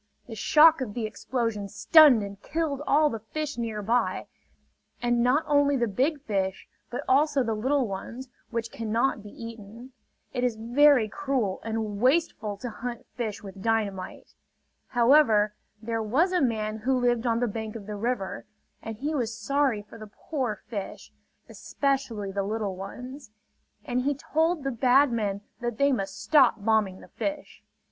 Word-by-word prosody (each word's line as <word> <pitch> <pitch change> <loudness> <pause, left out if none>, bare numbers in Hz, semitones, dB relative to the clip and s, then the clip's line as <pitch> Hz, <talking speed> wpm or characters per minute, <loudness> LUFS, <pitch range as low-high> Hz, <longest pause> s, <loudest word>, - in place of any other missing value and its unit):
The 235 - -9
shock 310 +7 +5
of 215 -6 -4
the 235 -2 -2
explosion 220 -2 -3
stunned 265 - +6
and 200 0 -8
killed 310 -3 -2
all 300 +1 +4
the 225 - -4
fish 290 +4 -5
nearby; 225 +1 -1 0.7
and 240 0 +1
not 255 +6 +3
only 285 -1 +3
the 240 -2 +1
big 270 +8 0
fish, 190 -4 -2 0.2
but 245 - -4
also 280 0 +3
the 225 -2 -1
little 260 +4 +1
ones, 230 +6 -6 0.2
which 230 -1 -3
cannot 230 +2 -1
be 205 - -11
eaten. 230 +2 -10 0.4
It 250 -1 -2
is 245 -3 +1
very 245 +2 +4
cruel 250 -5 -2
and 220 -2 -3
wasteful 255 -7 +1
to 245 +4 -5
hunt 240 +2 -6
fish 220 -5 -4
with 195 -1 -10
dynamite. 205 -4 -2 0.5
However, 235 -4 +4 0.3
there 225 0 -2
was 275 - +2
a 360 - +2
man 220 -4 0
who 255 +4 0
lived 240 -1 +1
on 230 0 +1
the 245 - +1
bank 220 0 -5
of 215 -3 -7
the 210 - -6
river; 210 -2 -3 0.4
and 225 -1 -7
he 295 +6 -2
was 235 -6 -2
sorry 260 -2 0
for 225 +2 -14
the 215 - -9
poor 240 0 -4
fish, 205 -4 -7 0.3
especially 260 -8 -2
the 200 +1 -1
little 205 -1 -2
ones; 250 +8 -8 0.6
and 250 0 -1
he 280 +2 0
told 320 +3 0
the 275 - -1
bad 255 +3 +4
men 205 -4 -1 0.2
that 240 -2 -3
they 280 0 +3
must 195 -6 -3
stop 280 -5 +5
bombing 215 -4 +1
the - - -14
fish. 295 -1 -5
235 Hz, 165 wpm, -27 LUFS, 215-270 Hz, 0.7 s, stunned